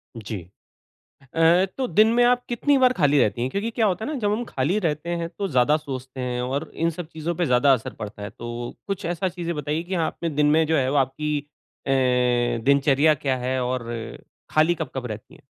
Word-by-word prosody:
जी। 110 Hz, -3 st, -6 dB, 0.9 s
अ, 165 Hz, +3 st, +4 dB
तो 265 Hz, -, -1 dB
दिन 215 Hz, 0 st, +5 dB
में 245 Hz, -, +4 dB
आप 245 Hz, 0 st, +3 dB
कितनी 275 Hz, +4 st, +2 dB
बार 255 Hz, -1 st, +5 dB
खाली 145 Hz, -, +3 dB
रहती 110 Hz, -1 st, +2 dB
हैं? 125 Hz, -, -1 dB
क्योंकि 205 Hz, +7 st, -2 dB
क्या 225 Hz, -1 st, +1 dB
होता 190 Hz, +1 st, -1 dB
है -, -, -3 dB
ना 295 Hz, -, -3 dB
जब 205 Hz, -2 st, 0 dB
हम 230 Hz, +3 st, -1 dB
खाली 165 Hz, -, -1 dB
रहते 160 Hz, -3 st, -2 dB
हैं 165 Hz, -, -3 dB
तो 200 Hz, -1 st, -1 dB
ज़्यादा 130 Hz, +1 st, +3 dB
सोचते 130 Hz, -3 st, -7 dB
हैं, 125 Hz, -1 st, -2 dB
और 140 Hz, +5 st, -3 dB
इन 165 Hz, +1 st, 0 dB
सब 165 Hz, 0 st, -7 dB
चीज़ों 160 Hz, +1 st, -4 dB
पे 175 Hz, 0 st, 0 dB
ज़्यादा 125 Hz, +2 st, +4 dB
असर 125 Hz, -4 st, -1 dB
पड़ता 105 Hz, 0 st, -8 dB
है। 100 Hz, -, -5 dB
तो 120 Hz, 0 st, -6 dB
कुछ 195 Hz, 0 st, -4 dB
ऐसा 175 Hz, +2 st, -1 dB
चीज़ें 170 Hz, -1 st, -4 dB
बताइए 150 Hz, +2 st, -2 dB
कि 180 Hz, +2 st, -5 dB
आपने 170 Hz, -, -4 dB
दिन 150 Hz, 0 st, +2 dB
में 160 Hz, +1 st, +4 dB
जो 160 Hz, +1 st, +2 dB
है 130 Hz, -3 st, +1 dB
वो 145 Hz, -, 0 dB
आपकी 145 Hz, +3 st, 0 dB, 0.5 s
अ, -, -, -1 dB, 0.7 s
दिनचर्या 140 Hz, +2 st, +4 dB
क्या 135 Hz, -2 st, -1 dB
है 130 Hz, +1 st, -1 dB
और 125 Hz, 0 st, -2 dB, 0.7 s
खाली 155 Hz, +3 st, +3 dB
कब-कब 135 Hz, -6 st, -5 dB
रहती 110 Hz, +1 st, -8 dB
है? -, -, -18 dB
150 Hz, 215 wpm, -24 LUFS, 130-180 Hz, 0.9 s, दिन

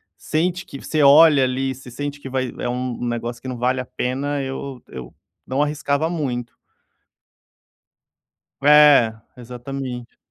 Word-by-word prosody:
sente 175 Hz, +3 st, -1 dB
que 140 Hz, -, -10 dB
você 155 Hz, -1 st, -1 dB
olha 145 Hz, 0 st, +7 dB
ali, 130 Hz, +1 st, -1 dB
você 130 Hz, 0 st, -12 dB
sente 145 Hz, +3 st, -5 dB
que 135 Hz, -, -8 dB
vai 130 Hz, -1 st, -2 dB
é 120 Hz, -, -2 dB
um 125 Hz, 0 st, -3 dB
negócio 120 Hz, 0 st, -4 dB
que -, -, -9 dB
não 125 Hz, -2 st, -4 dB
vale 125 Hz, +2 st, 0 dB
a -, -, -8 dB
pena, 140 Hz, +4 st, -3 dB
eu 135 Hz, -1 st, -6 dB
eu 65 Hz, -2 st, -9 dB, 0.4 s
não 135 Hz, +3 st, +1 dB
arriscava 150 Hz, +1 st, -1 dB
muito. 125 Hz, -8 st, -4 dB, 2.1 s
É, 145 Hz, -6 st, +7 dB, 0.2 s
exatamente. 125 Hz, 0 st, -7 dB
135 Hz, 140 wpm, -21 LUFS, 125-145 Hz, 2.1 s, olha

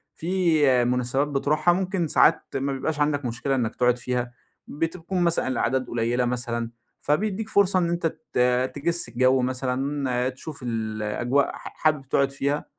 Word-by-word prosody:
في 160 Hz, -8 st, +2 dB
مناسبات 125 Hz, +3 st, 0 dB
بتروحها 150 Hz, +4 st, +2 dB
ممكن 185 Hz, -2 st, -1 dB
ساعات 155 Hz, +2 st, +4 dB
ما 135 Hz, +1 st, -1 dB
بيبقاش 150 Hz, +3 st, -3 dB
عندك 145 Hz, -2 st, +1 dB
مشكلة 120 Hz, +3 st, -1 dB
إنك 115 Hz, -3 st, -1 dB
تقعد 125 Hz, 0 st, +2 dB
فيها، 125 Hz, 0 st, -3 dB, 0.3 s
بتكون 165 Hz, +4 st, -3 dB
مثلًا 170 Hz, -5 st, +1 dB
الأعداد 130 Hz, 0 st, 0 dB
قليلة 120 Hz, +1 st, 0 dB
مثلًا، 120 Hz, -1 st, -2 dB, 0.3 s
فبيديك 210 Hz, +7 st, -1 dB
فرصة 195 Hz, -3 st, +3 dB
إن 170 Hz, -1 st, +1 dB
أنت 170 Hz, -1 st, 0 dB, 0.3 s
ت -, -, 0 dB, 0.4 s
تجس 165 Hz, -1 st, -1 dB
الجو 130 Hz, +2 st, +3 dB
مثلًا، 130 Hz, 0 st, -1 dB
تشوف 140 Hz, +3 st, -9 dB
الأجواء 115 Hz, +3 st, -1 dB
ح -, -, -10 dB, 0.2 s
حابب 155 Hz, -3 st, +3 dB
تقعد 135 Hz, 0 st, +2 dB
فيها 140 Hz, +2 st, -1 dB
135 Hz, 145 wpm, -25 LUFS, 125-160 Hz, 0.4 s, ساعات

